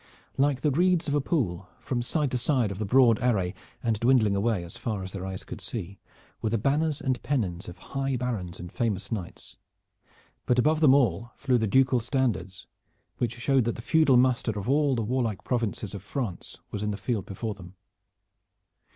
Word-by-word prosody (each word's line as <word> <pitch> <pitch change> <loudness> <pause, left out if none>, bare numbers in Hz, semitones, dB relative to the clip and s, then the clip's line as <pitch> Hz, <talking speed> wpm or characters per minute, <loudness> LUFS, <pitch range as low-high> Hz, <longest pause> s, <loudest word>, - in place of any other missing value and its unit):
Like 135 -1 +2
the 150 - +2
reeds 175 +3 +2
of 145 - 0
a 145 - +2
pool 100 - -1
from 125 -2 -2
side 140 +3 0
to 125 - 0
side 125 -4 +1
of 100 - -6
the 105 - -2
broad 120 -1 +5
array, 100 -7 +1 0.3
and 115 -3 0
dwindling 115 -4 +4
away 100 -2 +1
as 85 - -8
far 105 -4 -3
as 95 - -7
their 95 -1 -5
eyes 95 -1 -5
could - - -8
see, 100 +3 -5 0.4
were 110 - 0
the 115 - +1
banners 145 +6 +1
and 130 -2 -1
pennons 95 -12 -2
of 90 - -10
high 135 +6 -3
barons 115 -9 -3
and 90 0 -8
famous 105 -4 -2
knights, 100 -6 -6 0.9
but 125 - +3
above 155 +5 +3
them 145 -4 +6
all 120 -3 +1
flew 130 -3 +1
the 110 - +1
ducal 130 +3 +4
standards 115 -7 -1 0.5
which 120 -1 -1
showed 135 +2 +2
that 120 - -1
the - - -7
feudal 155 -4 +4
muster 125 -3 +2
of 100 - -4
all 140 0 +3
the 115 - -1
warlike 115 -3 -1
provinces 115 -4 -2
of 100 - -6
France 105 -3 -5
was 105 - -4
in 105 - -1
the 100 - -2
field 105 -1 -2
before 110 +2 -4
them. 95 -2 -13
120 Hz, 195 wpm, -27 LUFS, 100-130 Hz, 0.9 s, them